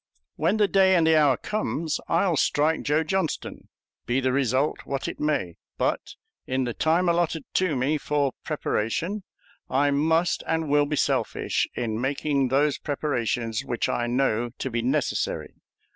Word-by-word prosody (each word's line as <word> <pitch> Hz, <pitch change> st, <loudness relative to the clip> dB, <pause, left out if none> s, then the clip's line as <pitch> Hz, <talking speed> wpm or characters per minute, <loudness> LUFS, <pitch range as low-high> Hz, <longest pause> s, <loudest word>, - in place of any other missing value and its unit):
When 170 Hz, +7 st, +1 dB
the 210 Hz, -1 st, +4 dB
day 190 Hz, -1 st, +4 dB
and 170 Hz, -2 st, +4 dB
the 160 Hz, 0 st, +5 dB
hour 145 Hz, -5 st, +4 dB
comes, 170 Hz, -7 st, -2 dB
I'll 170 Hz, +1 st, +2 dB
strike 155 Hz, +2 st, +2 dB
Joe 150 Hz, +2 st, +1 dB
Johnston, 190 Hz, 0 st, -3 dB, 0.4 s
be 120 Hz, +3 st, +1 dB
the 130 Hz, -1 st, +1 dB
result 135 Hz, +2 st, +1 dB
what 135 Hz, -1 st, -3 dB
it -, -, -6 dB
may; 120 Hz, -, -1 dB, 0.2 s
but -, -, -1 dB, 0.3 s
in 130 Hz, 0 st, 0 dB
the 120 Hz, -1 st, -2 dB
time 165 Hz, +7 st, +2 dB
allotted 170 Hz, -2 st, +1 dB
to 185 Hz, -5 st, +1 dB
me 140 Hz, +4 st, 0 dB
for 145 Hz, -3 st, 0 dB
preparation 165 Hz, -, -2 dB, 0.5 s
I 140 Hz, +2 st, +2 dB
must 160 Hz, +4 st, +2 dB
and 160 Hz, -2 st, -1 dB
will 145 Hz, 0 st, +3 dB
be 150 Hz, -, -1 dB
selfish -, -, 0 dB
in 115 Hz, -2 st, -2 dB
making 140 Hz, 0 st, 0 dB
those 140 Hz, +2 st, +1 dB
preparations 120 Hz, -6 st, -1 dB
which 120 Hz, -4 st, -1 dB
I 120 Hz, -, 0 dB
know 120 Hz, -2 st, +1 dB
to 130 Hz, -, -4 dB
be 120 Hz, 0 st, -1 dB
necessary. 130 Hz, +2 st, -1 dB
145 Hz, 160 wpm, -25 LUFS, 130-160 Hz, 0.5 s, the